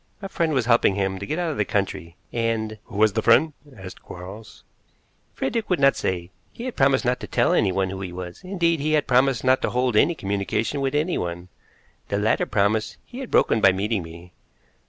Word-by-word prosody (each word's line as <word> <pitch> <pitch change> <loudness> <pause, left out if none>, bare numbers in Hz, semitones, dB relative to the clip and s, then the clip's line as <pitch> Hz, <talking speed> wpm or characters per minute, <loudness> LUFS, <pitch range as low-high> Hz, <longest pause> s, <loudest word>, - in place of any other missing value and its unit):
A 195 - -6
friend 165 -4 0
was 130 -6 +1
helping 115 -5 +3
him 95 -1 -1
to 100 - -6
get 155 - -2
out 175 -2 -1
of 150 - -5
the - - +2
country, 95 -5 -3 0.2
and 115 -2 -2
" - - -42
"Who - - -9
was 110 -1 +4
the - - 0
friend?" 150 +7 +4 0.2
asked 95 -1 -10
Quarles. 100 +4 -11 0.7
"Frederick 220 +11 -2
would 180 - +1
not 135 0 +5
say. 90 -1 -3 0.2
He 235 - -9
had 255 - -5
promised 135 -2 +3
not 125 +1 +1
to - - -7
tell - - +2
anyone 95 0 +1
who 95 0 -6
he 95 -2 -5
was; 90 0 -8
indeed, 170 -3 0
he 155 +2 0
had 150 -2 +2
promised 130 -1 +2
not 130 0 +3
to - - 0
hold 125 -1 0
any 165 +10 +4
communication 100 +5 -2
with 135 +1 -1
anyone. 90 - -2 0.6
The 100 - -1
latter 105 +2 +1
promise 105 +2 0
he 245 - -10
had 265 - -6
broken 110 - +3
by 95 - +6
meeting 100 +2 -1
me. 85 +1 -12
110 Hz, 215 wpm, -23 LUFS, 95-140 Hz, 0.7 s, by